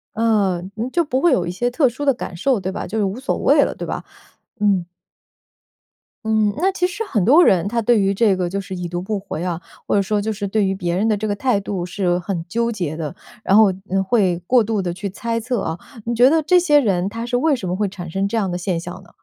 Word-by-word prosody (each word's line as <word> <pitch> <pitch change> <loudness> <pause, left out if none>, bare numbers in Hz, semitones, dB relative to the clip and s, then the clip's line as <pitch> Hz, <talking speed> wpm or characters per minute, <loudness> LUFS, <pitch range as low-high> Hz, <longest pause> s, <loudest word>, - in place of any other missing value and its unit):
呃， 210 -5 +1 0.3
就 345 - +3
不 260 -4 -1
会 345 - +4
有 180 -9 +1
一 175 - -3
些 240 +7 -1
特 260 +1 +2
殊 290 +5 -6
的 275 - +4
感 215 -7 -7
受 260 +7 +2
对 190 0 -3
吧， - - -5
就 220 - -4
是 215 - +1
无 195 +4 -2
所 265 - -2
谓 - - +4
了 - - -2
对 - - -6
吧？ - - -4 0.6
嗯。 195 -4 +1 1.4
嗯， 215 -1 +2
那 380 +4 +2
其 360 -1 0
实 370 +5 -4
很 215 - 0
多 295 - +6
人 185 0 +3
他 230 +2 -1
对 235 0 +4
于 195 0 +2
这 200 0 +3
个 180 -1 -2
就 200 +3 -2
是 195 0 -7
已 180 -1 -4
读 175 +1 -4
不 200 +3 -3
回 185 -4 -6
啊， 175 -1 -3 0.3
或 - - +1
者 200 - +4
说 205 +2 0
就 220 +2 -2
是 200 -1 -4
对 205 +1 +1
于 190 - 0
别 175 -3 -2
人 210 +4 +1
的 220 - +2
这 210 +1 -3
个 205 - -1
态 245 -1 +1
度 195 -3 -4
是 180 -1 0
很 180 -1 -3
纠 235 +3 0
结 175 -8 -3
的。 160 0 -5 0.3
然 195 - +3
后 215 -2 +6 0.4
会 190 -6 +2
过 250 -2 +4
度 215 -1 -1
地 180 -2 -2
去 180 +4 -5
猜 230 +4 -3
测 240 -1 -2
啊， 160 - -3 0.3
你 235 +1 -1
觉 245 +2 +6
得 320 +3 +3
这 360 +4 +4
些 300 -4 +4
人 190 -8 +1
他 230 +3 -5
是 245 0 0
为 295 +3 +2
什 195 -8 -5
么 180 - -1
会 205 +1 0
产 185 -3 -8
生 195 +4 -1
这 200 - -4
样 205 -4 0
的 175 - -2
现 180 -1 -2
象 180 +3 -8
呢？ 175 - -19
205 Hz, 285 characters per minute, -20 LUFS, 185-235 Hz, 1.4 s, 多